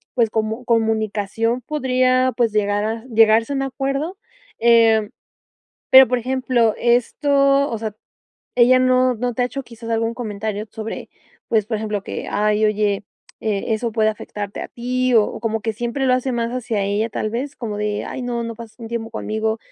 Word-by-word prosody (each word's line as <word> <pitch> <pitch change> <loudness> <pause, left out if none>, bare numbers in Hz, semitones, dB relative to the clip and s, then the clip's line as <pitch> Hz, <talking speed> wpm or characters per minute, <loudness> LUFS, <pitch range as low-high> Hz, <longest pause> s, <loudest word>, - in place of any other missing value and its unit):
pues 235 -3 +3
como 220 +2 -2
comunicación 225 0 0
podría, 255 -2 +1
pues 235 -2 +2
llegar 205 -1 +1
a 225 +2 -3
llegarse 225 +1 +4
a - - -2
un 270 - 0
acuerdo, 275 +6 -3 0.4
eh, 225 -2 +4 0.8
pero 265 0 +9
por 250 +1 0
ejemplo, 250 -2 +1
esto 275 +3 +2
o 230 - -2
sea, 215 -2 -4 0.6
ella 250 +1 +6
no 255 0 +3
no 245 +1 -2
te 250 - 0
ha - - +3
hecho 275 +2 -6
quizás 230 -1 -9
algún 225 0 0
comentario 215 -2 -4
sobre 220 +1 -6 0.4
pues, 215 -3 +2
por 220 0 -1
ejemplo, 210 -2 -3
que: - - -6
"Ay, 210 +1 +1
oye, 210 -1 +1 0.4
eh, 210 -3 -2
eso 230 +1 -2
puede 215 -1 +2
afectarte 205 -1 -5
a - - -7
ti", 255 +1 -1
o 220 -2 +6
o - - -6
como 225 -1 -1
que 225 +1 -2
siempre 240 +4 -2
lo 255 - +4
hace 255 +1 -1
más 235 -1 -1
hacia 240 -4 -2
ella 205 +3 -1
tal 215 - -2
vez 265 +5 -4
como 215 -4 -4
de: 210 0 -2
"Ay, 260 - -5
no 240 -1 -2
no 230 0 -5
pasa 225 -1 -11
un 230 -2 -8
tiempo 230 -1 -4
conmigo", 220 0 -2
230 Hz, 185 wpm, -20 LUFS, 215-255 Hz, 0.8 s, pero